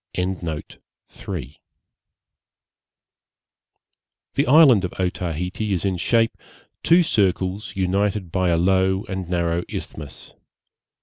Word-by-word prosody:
The 85 -7 -6 3.0
island 135 - +7
of 90 - -3
Otaheite 90 0 -3
is 100 -4 -1
in 95 -2 0
shape 115 +7 +2 0.5
two 175 +2 +5
circles 100 - 0
united 95 0 0
by 95 0 +1
a 85 - +2
low 95 +2 +2
and 95 -6 -5
narrow 85 -1 0
isthmus. 75 -3 -7
95 Hz, 85 wpm, -22 LUFS, 90-100 Hz, 3.0 s, island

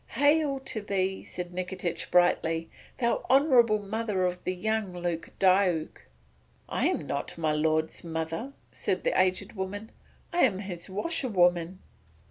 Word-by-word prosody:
"Hail 290 0 +3
to 265 -5 -3
thee!" 190 -2 -1
said 180 0 -7
Nikitich 180 -1 -3
brightly, 165 -2 +2 0.3
"thou 235 -2 0
honourable 255 -5 +5
mother 205 -2 -1
of 180 0 -2
the 185 - -1
young 220 0 -1
Lord 175 -2 -3
Diuk." 185 -4 +2 0.6
"I - - +1
am - - -1
not 140 +3 -4
my 160 -2 +1
lord's 155 +1 0
mother," 165 - -4 0.2
said - - -2
the - - +3
aged 185 +1 0
woman, 205 +2 -5 0.4
"I 350 - 0
am 230 - +4
his 190 -3 -7
washerwoman." 185 - +1
190 Hz, 135 wpm, -28 LUFS, 175-220 Hz, 0.6 s, honourable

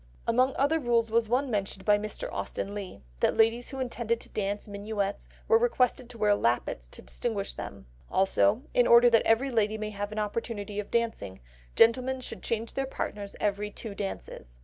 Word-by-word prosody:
Among 255 +3 +3
other 295 +4 +2
rules 235 -4 +1
was 230 -1 +2
one 255 +2 +1
mentioned 195 -2 -2
by 205 -1 +5
Mr. 215 - -5
Austen 200 - -4
Leigh, 195 - -7 0.2
that - - +2
ladies 225 +2 +3
who 270 - -6
intended 235 -2 -1
to - - -9
dance 205 0 -3
minuets 205 0 -3 0.2
were 455 - +5
requested 255 - +1
to 245 - -9
wear 210 -1 +3
lappets 115 - 0
to - - -12
distinguish - - -3
them. 65 - -8 0.2
Also, 105 - +3
in 245 - +4
order 235 +1 +7
that 230 - +6
every 245 +5 +3
lady 220 -2 +1
may 215 0 -4
have 205 0 -4
an 215 - -7
opportunity 210 -1 -3
of 210 - -5
dancing, 225 - -1 0.4
gentlemen 260 +3 +4
should 225 -6 -7
change 230 0 -2
their 270 0 -2
partners 205 -6 -5
every 210 0 -1
two 210 +1 -7
dances. 60 - -6
220 Hz, 185 wpm, -28 LUFS, 200-240 Hz, 0.4 s, order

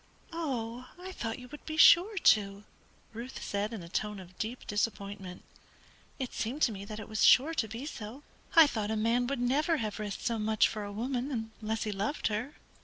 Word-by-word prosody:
"Oh, 255 -7 -3
I 370 +1 -7
thought 225 -10 -4
you 250 -1 -10
would 295 - -10
be 310 0 -4
sure 375 +6 +7
to," 200 - +3 0.5
Ruth 235 +4 -7
said 205 +2 -2
in 215 -6 -6
a - - -9
tone 210 +3 -2
of 185 -1 -12
deep 230 +3 -4
disappointment. 200 -3 -3 0.7
"It 260 -3 -4
seemed 260 +7 -2
to 235 - +4
me 200 -1 -7
that 215 +1 -7
it 215 - -7
was 215 -1 -1
sure 295 +6 +6
to 235 -8 0
be 225 +6 -6
so. 245 -1 -7 0.3
I 325 -1 +10
thought 215 -7 -2
a 220 - 0
man 230 +3 +1
would 275 -1 -2
never 290 +7 +2
have 215 -5 -3
risked 205 -2 -5
so 230 -1 0
much 215 0 +3
for 215 -1 -5
a 205 - -6
woman 240 +1 -3
unless 220 +1 -1
he 215 - -2
loved 205 +9 -1
her." 220 +7 -3
225 Hz, 205 wpm, -31 LUFS, 210-260 Hz, 0.7 s, I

